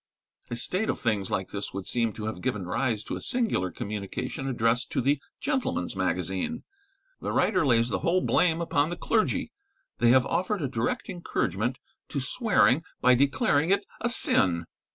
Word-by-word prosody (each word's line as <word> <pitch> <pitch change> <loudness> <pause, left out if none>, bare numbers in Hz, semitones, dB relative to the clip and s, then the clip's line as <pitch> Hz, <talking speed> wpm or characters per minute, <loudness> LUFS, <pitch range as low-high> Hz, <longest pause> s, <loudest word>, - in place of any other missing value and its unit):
A 120 - -3
state 185 - -1
of - - -1
things 105 -5 0
like 95 - -2
this 100 -1 -5
would 100 -1 -4
seem 115 -2 +1
to 105 - -6
have 110 - -4
given 105 -8 -2
rise 110 +4 -1
to - - -4
a - - -6
singular 225 - 0
communication 105 +8 -5
addressed 120 -1 0
to - - +1
the 140 +3 +1 0.2
'Gentleman's 265 - -1
Magazine.' 95 - -2 0.6
The - - -3
writer 185 -3 +2
lays 115 -1 +3
the - - -1
whole 180 +2 +2
blame 165 -2 +2
upon 155 -2 +1
the 175 - -4
clergy; 215 - 0 0.5
they 120 - +4
have 130 +1 +5
offered 180 +2 -1
a - - +1
direct 120 -2 -2
encouragement 125 - -2 0.3
to 140 - -2
swearing 155 - +3 0.2
by 125 - +5
declaring 140 +4 +2
it 200 +1 +2 0.2
a 240 - +1
sin. 90 - +3
125 Hz, 175 wpm, -27 LUFS, 105-170 Hz, 0.6 s, have